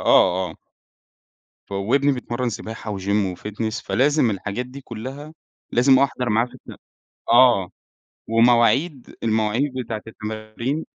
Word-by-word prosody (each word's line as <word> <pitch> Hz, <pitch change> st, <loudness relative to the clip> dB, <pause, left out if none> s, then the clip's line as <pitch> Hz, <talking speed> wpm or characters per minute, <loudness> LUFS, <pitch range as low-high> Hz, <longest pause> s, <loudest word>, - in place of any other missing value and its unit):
آه، 90 Hz, -1 st, +4 dB
آه، -, -, -11 dB, 1.1 s
ف -, -, -14 dB
وابني 130 Hz, +9 st, +2 dB
بيتمرّن 125 Hz, -1 st, -3 dB
سباحة 110 Hz, -2 st, -6 dB
وgym 100 Hz, -1 st, 0 dB
وfitness 110 Hz, +3 st, -4 dB
فلازم 145 Hz, -2 st, +2 dB
الحاجات 100 Hz, +4 st, -4 dB
دي 130 Hz, +2 st, -10 dB
كلّها 135 Hz, +5 st, -8 dB, 0.4 s
لازم 130 Hz, +2 st, +5 dB
أحضَر 130 Hz, -2 st, 0 dB
معاه 115 Hz, +3 st, +2 dB
في -, -, -18 dB
الت -, -, -12 dB, 0.5 s
آه، 120 Hz, -7 st, +5 dB, 0.6 s
ومواعيد 120 Hz, +5 st, +3 dB
المواعيد 110 Hz, +5 st, +1 dB
بتاعة 110 Hz, -2 st, -5 dB
التمارين 110 Hz, +7 st, -5 dB
115 Hz, 120 wpm, -22 LUFS, 105-130 Hz, 1.1 s, لازم